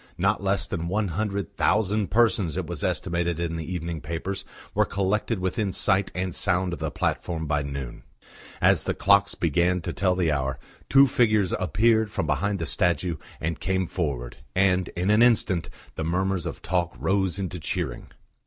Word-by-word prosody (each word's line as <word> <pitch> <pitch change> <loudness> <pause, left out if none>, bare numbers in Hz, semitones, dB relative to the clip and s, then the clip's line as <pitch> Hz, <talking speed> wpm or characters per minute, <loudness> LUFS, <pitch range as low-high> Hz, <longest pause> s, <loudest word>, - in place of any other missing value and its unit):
Not 100 +2 +1
less 100 0 +1
than 85 -3 -4
one 100 +2 0
hundred 100 +2 -3
thousand 105 -1 +2
persons, 105 -7 +2
it 95 - -2
was 85 -3 -5
estimated 85 -1 -1
in 85 -1 -2
the 80 +2 -5
evening 85 -3 -4
papers, 85 +5 -4 0.3
were - - +3
collected 100 +3 -1
within 95 +2 -1
sight 95 0 +2
and 90 -1 -2
sound 90 +1 +1
of 85 - -5
the - - -2
platform 80 -2 -2
by 75 -1 0
noon. 70 -3 -6 0.6
As - - +4
the - - -1
clocks 100 0 +4
began 85 +3 +1
to - - -4
tell 90 -1 +1
the 90 -3 +1
hour, 70 -2 -1 0.3
two 135 0 +7
figures 110 -7 +2
appeared 110 +4 +2
from 80 - -2
behind 100 +8 0
the 85 - -3
statue 85 -1 +1 0.2
and 80 +1 -3
came 95 0 0
forward, 70 -9 -3 0.2
and, 95 -1 +3
in 90 +4 +1
an 105 +2 +4
instant, 110 -7 +3 0.2
the 80 - -4
murmurs 90 +1 0
of - - -7
talk 85 0 -1
rose 95 -2 0
into 90 -2 -4
cheering. 75 - -3
90 Hz, 175 wpm, -25 LUFS, 85-100 Hz, 0.6 s, two